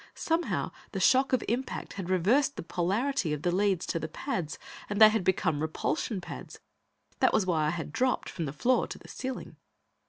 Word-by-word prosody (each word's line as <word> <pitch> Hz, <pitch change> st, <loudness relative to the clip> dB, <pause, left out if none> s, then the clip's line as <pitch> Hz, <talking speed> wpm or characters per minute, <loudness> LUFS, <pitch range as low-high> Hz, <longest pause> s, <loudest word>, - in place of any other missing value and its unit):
Somehow, 330 Hz, +1 st, -1 dB, 0.2 s
the 195 Hz, -, -2 dB
shock 260 Hz, +8 st, +4 dB
of 255 Hz, -3 st, +2 dB
impact 250 Hz, +4 st, -3 dB
had 190 Hz, -3 st, -5 dB
reversed 235 Hz, -, +3 dB
the -, -, -5 dB
polarity 195 Hz, -, 0 dB
of 150 Hz, 0 st, -4 dB
the 175 Hz, -, +2 dB
leads 190 Hz, -1 st, +1 dB
to 165 Hz, -, -1 dB
the 155 Hz, -, -3 dB
pads, 180 Hz, -, -3 dB, 0.3 s
and 205 Hz, 0 st, -2 dB
they 215 Hz, -1 st, +10 dB
had 215 Hz, -3 st, 0 dB
become 160 Hz, -5 st, +1 dB
repulsion 155 Hz, +6 st, -1 dB
pads. -, -, -9 dB, 0.6 s
That -, -, +4 dB
was 205 Hz, -, +3 dB
why 160 Hz, -4 st, +1 dB
I -, -, +2 dB
had 160 Hz, -2 st, -4 dB
dropped 255 Hz, 0 st, +1 dB
from 165 Hz, -, -4 dB
the 135 Hz, -, -3 dB
floor 245 Hz, -, +2 dB
to -, -, -7 dB
the -, -, -15 dB
ceiling. 260 Hz, -1 st, -6 dB
190 Hz, 195 wpm, -29 LUFS, 165-255 Hz, 0.6 s, they